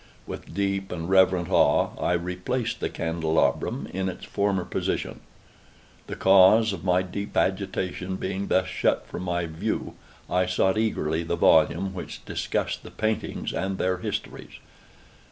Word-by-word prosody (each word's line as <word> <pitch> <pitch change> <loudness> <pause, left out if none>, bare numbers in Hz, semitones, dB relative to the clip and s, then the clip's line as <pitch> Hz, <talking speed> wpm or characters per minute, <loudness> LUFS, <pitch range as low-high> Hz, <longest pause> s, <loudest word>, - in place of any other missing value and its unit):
With - - -8
deep 100 -1 -1
and 85 -2 -4
reverent 95 -2 +3
awe - - +4
I - - +2
replaced 90 +8 -2
the - - -1
candelabrum 80 -1 0
in 95 +1 -1
its 95 - -8
former 100 -3 0
position. 90 - -2 0.9
The - - -5
cause 100 +3 +6
of - - -7
my 90 -1 +2
deep 100 +3 -5
agitation 95 -1 -1
being 95 +1 -3
thus 95 - +2
shut 95 - 0
from 90 0 -6 0.2
view, 80 - -3 0.3
I 90 0 +1
sought 95 +2 +2
eagerly 80 -8 0
the 85 +1 -2
volume 85 +4 +3
which 90 - -8
discussed - - -2
the - - -11
paintings 110 0 -2
and 95 0 -2
their 95 0 0
histories. - - -5
95 Hz, 140 wpm, -26 LUFS, 90-95 Hz, 0.9 s, cause